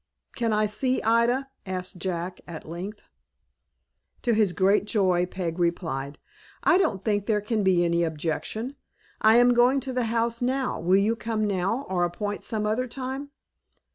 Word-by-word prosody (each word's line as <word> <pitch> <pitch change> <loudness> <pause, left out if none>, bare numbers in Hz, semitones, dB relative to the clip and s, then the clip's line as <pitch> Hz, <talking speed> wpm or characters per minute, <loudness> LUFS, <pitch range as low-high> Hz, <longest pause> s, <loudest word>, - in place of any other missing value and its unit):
"Can 230 -2 0
I 215 0 +2
see 255 +5 0
Ida?" 235 +4 +2 0.2
asked 185 -1 -5
Jack, 180 0 -4
at 165 -3 -8
length. 185 +6 -7 1.2
To 240 - +2
his 215 -4 +3
great 190 +4 +2
joy, 185 -5 +2
Peg 180 -2 -4
replied, 155 -5 -2 0.5
"I 370 0 +5
don't 210 - 0
think 205 -2 0
there 215 -2 +2
can 215 +1 -1
be 180 -2 +3
any 170 0 +2
objection. 165 - -3 0.5
I 220 +1 +6
am 245 +1 +6
going 245 +3 +4
to 260 0 -4
the 250 -1 0
house 230 +1 0
now. 260 +1 0
Will 185 +3 +3
you 210 +3 +2
come 220 -1 -2
now, 200 +7 -1
or 180 -2 0
appoint 205 +4 -3
some 215 -2 -2
other 225 +4 0
time?" 265 +3 -5
210 Hz, 165 wpm, -26 LUFS, 180-235 Hz, 1.2 s, I